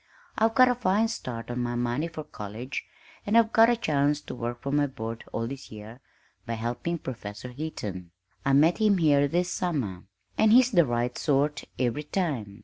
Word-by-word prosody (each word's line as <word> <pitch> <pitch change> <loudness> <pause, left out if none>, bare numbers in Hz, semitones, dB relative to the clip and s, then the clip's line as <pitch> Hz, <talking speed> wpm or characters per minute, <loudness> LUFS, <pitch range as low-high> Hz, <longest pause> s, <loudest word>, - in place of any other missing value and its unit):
I've 225 +1 +2
got 255 0 +7
a 250 - +3
fine 225 -1 +1
start 120 - -5
on 120 - -3
my 120 0 -2
money 120 +6 -1
for 165 -2 -7
college, 115 -1 -6 0.4
and 210 +3 +2
I've 230 -1 +4
got 225 +1 +7
a 240 - +4
chance 145 -6 +1
to - - -8
work 120 0 -4
for 140 - -4
my 145 0 +2
board 115 -4 -6
all 115 - -2
this 135 +3 -8
year 110 +3 -10 0.5
by 115 - -2
helping 120 +9 -3
Professor 115 -5 -7
Heaton. 110 - -6 0.3
I 135 - +2
met 155 +7 +4
him 210 -3 +4
here 145 -4 +4
this 175 +4 0
summer, 130 - -2 0.3
and 220 -1 +5
he's 250 +1 +6
the 170 - +4
right 120 +1 -1
sort 145 0 0
every 125 +3 0
time. 140 - -3
140 Hz, 190 wpm, -27 LUFS, 120-175 Hz, 0.5 s, got